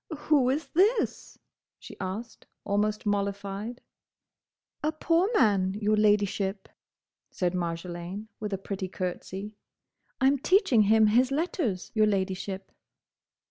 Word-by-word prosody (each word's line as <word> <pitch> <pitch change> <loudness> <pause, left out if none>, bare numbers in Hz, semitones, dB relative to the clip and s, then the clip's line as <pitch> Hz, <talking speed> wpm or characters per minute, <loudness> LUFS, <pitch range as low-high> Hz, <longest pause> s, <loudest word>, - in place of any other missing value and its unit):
"Who 290 -3 +3
is 290 +5 -1
this?" 410 +6 +1 0.4
she - - -11
asked, 205 +5 -6 0.2
almost 210 +1 0
mollified. 200 +3 -2 1.0
"A 305 - +1
poor 330 +4 +1
man, 195 - +3
your 210 0 +1
Ladyship," 205 -2 +1 0.6
said 180 -1 -1
Marjolaine, 175 +3 -4
with 210 -1 -4
a 195 - -1
pretty 195 0 -5
curtsey. 190 +3 -5 0.6
"I'm 270 +1 +3
teaching 365 - +4
him 220 +1 +5
his 240 +5 +4
letters, 275 - -1
your 215 -2 +4
Ladyship." 190 -1 -2
210 Hz, 110 wpm, -28 LUFS, 195-250 Hz, 1.0 s, him